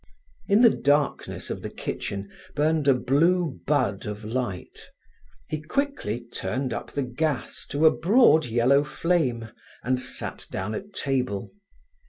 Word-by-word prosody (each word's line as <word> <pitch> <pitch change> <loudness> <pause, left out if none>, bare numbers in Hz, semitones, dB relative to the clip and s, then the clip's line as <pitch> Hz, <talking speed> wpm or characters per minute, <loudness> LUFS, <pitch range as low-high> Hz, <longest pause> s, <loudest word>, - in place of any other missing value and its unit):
In 205 +4 +5
the 230 - +8
darkness 145 0 0
of - - -4
the - - -5
kitchen 100 0 -5 0.3
burned 150 0 +1
a 135 - +6
blue 155 +4 +2
bud 130 -10 +1
of 105 +1 -6
light. 110 -5 -4 0.6
He 155 -1 -3
quickly 155 - -2
turned 130 0 -2
up - - -5
the 140 - 0
gas 135 +3 -3
to 145 +3 +1
a 160 - +6
broad 175 - +5
yellow 120 +5 +3
flame, 145 -8 0 0.3
and 125 +1 0
sat - - -5
down 95 +3 -3
at 200 - -6
table. 125 -8 -1
140 Hz, 140 wpm, -26 LUFS, 120-160 Hz, 0.6 s, the